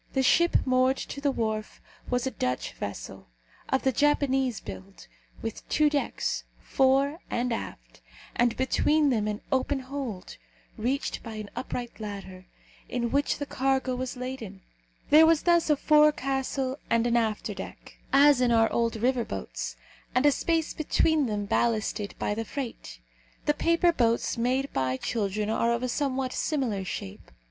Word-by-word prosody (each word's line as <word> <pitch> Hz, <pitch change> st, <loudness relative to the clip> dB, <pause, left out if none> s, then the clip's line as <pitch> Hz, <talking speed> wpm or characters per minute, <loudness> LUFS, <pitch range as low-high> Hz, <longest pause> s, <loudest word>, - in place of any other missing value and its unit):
The 265 Hz, -, +2 dB
ship 340 Hz, +6 st, +4 dB
moored 255 Hz, +1 st, +3 dB
to 280 Hz, -, -6 dB
the 285 Hz, -, +2 dB
wharf 220 Hz, -4 st, -2 dB, 0.3 s
was 245 Hz, 0 st, 0 dB
a 265 Hz, -, -1 dB
Dutch 125 Hz, -, -2 dB
vessel, -, -, -7 dB, 0.4 s
of 265 Hz, -, +1 dB
the 265 Hz, -, +3 dB
Japanese 270 Hz, -3 st, +2 dB
build, 95 Hz, -1 st, -10 dB, 0.4 s
with 225 Hz, -1 st, -6 dB
two 300 Hz, -1 st, +3 dB
decks, 290 Hz, -1 st, -1 dB, 0.2 s
fore 275 Hz, +3 st, +2 dB
and 240 Hz, 0 st, 0 dB
aft, -, -, -7 dB, 0.3 s
and 240 Hz, -1 st, +2 dB
between 295 Hz, +3 st, +2 dB
them 215 Hz, -4 st, +1 dB
an 210 Hz, 0 st, -3 dB
open 265 Hz, +1 st, +1 dB
hold, 255 Hz, -7 st, -6 dB, 0.4 s
reached 255 Hz, +5 st, -2 dB
by 225 Hz, -2 st, -8 dB
an 215 Hz, -1 st, -7 dB
upright 245 Hz, -2 st, -5 dB
ladder, 195 Hz, -3 st, -7 dB, 0.4 s
in 240 Hz, -1 st, -1 dB
which 285 Hz, +1 st, +1 dB
the 285 Hz, -, -3 dB
cargo 265 Hz, -1 st, 0 dB
was 255 Hz, 0 st, -4 dB
laden. 245 Hz, -7 st, -6 dB, 0.5 s
There 315 Hz, +2 st, +8 dB
was 325 Hz, -2 st, +3 dB
thus 340 Hz, -2 st, +3 dB
a 300 Hz, -, +4 dB
forecastle 275 Hz, -3 st, +2 dB
and 230 Hz, 0 st, +2 dB
an 240 Hz, 0 st, +2 dB
afterdeck, 220 Hz, -3 st, -3 dB
as 280 Hz, -1 st, +6 dB
in 245 Hz, -1 st, +3 dB
our 225 Hz, -1 st, +3 dB
old 230 Hz, -1 st, +1 dB
river 245 Hz, +2 st, +1 dB
boats, -, -, -5 dB, 0.4 s
and 255 Hz, +3 st, +3 dB
a 290 Hz, -, +7 dB
space 325 Hz, +2 st, 0 dB
between 310 Hz, -1 st, +2 dB
them 205 Hz, -2 st, -2 dB
ballasted 215 Hz, -1 st, 0 dB
by -, -, -1 dB
the 225 Hz, +2 st, -2 dB
freight. 225 Hz, -, -6 dB, 0.5 s
The 295 Hz, -, +3 dB
paper 335 Hz, +3 st, +3 dB
boats 235 Hz, -5 st, +1 dB
made 255 Hz, +4 st, 0 dB
by 130 Hz, -1 st, 0 dB
children 210 Hz, -, -1 dB
are 230 Hz, +1 st, +1 dB
of 235 Hz, +1 st, -1 dB
a -, -, +1 dB
somewhat 260 Hz, 0 st, -1 dB
similar 250 Hz, -, -1 dB
shape. 95 Hz, -, -7 dB
255 Hz, 155 wpm, -27 LUFS, 220-275 Hz, 0.5 s, There